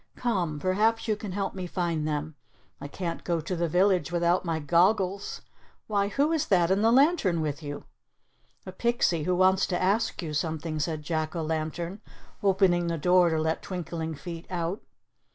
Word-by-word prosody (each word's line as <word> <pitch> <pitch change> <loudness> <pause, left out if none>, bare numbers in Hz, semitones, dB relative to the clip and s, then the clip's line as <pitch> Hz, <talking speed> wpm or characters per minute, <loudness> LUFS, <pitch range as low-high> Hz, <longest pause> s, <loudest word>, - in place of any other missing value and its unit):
Come, 180 -11 -1
perhaps 215 +8 +1
you 215 - +2
can 210 -2 -7
help 195 -1 -2
me 185 -2 -5
find 170 -4 -1
them. 150 +1 -2 0.5
I - - -6
can't 170 +2 -5
go 170 -2 0
to 160 +4 -3
the 170 0 0
village 180 +2 +2
without 175 +1 +2
my 165 -3 -1
goggles. 185 +5 +1 0.4
Why, 200 -2 +1
who 280 +9 +1
is 320 -3 0
that 175 -3 +3
in 195 +2 +2
the 225 +1 +4
lantern 265 - +3
with 150 -1 -2
you?" 145 -1 -6 0.8
"A 185 - -6
pixie 185 -7 0
who 180 - +1
wants 185 +1 +3
to 180 - -1
ask 200 +1 0
you 155 -2 -4
something," 155 0 -2
said 155 0 -2
Jack 155 +1 -2
o' 165 - -2
Lantern, 160 +5 -3 0.4
opening 185 -3 +3
the 170 0 -1
door 180 +3 +4
to 160 - 0
let 160 +1 -1
Twinkling 165 -3 -4
Feet 165 +4 -8
out. 175 +2 -2
175 Hz, 180 wpm, -27 LUFS, 160-195 Hz, 0.8 s, the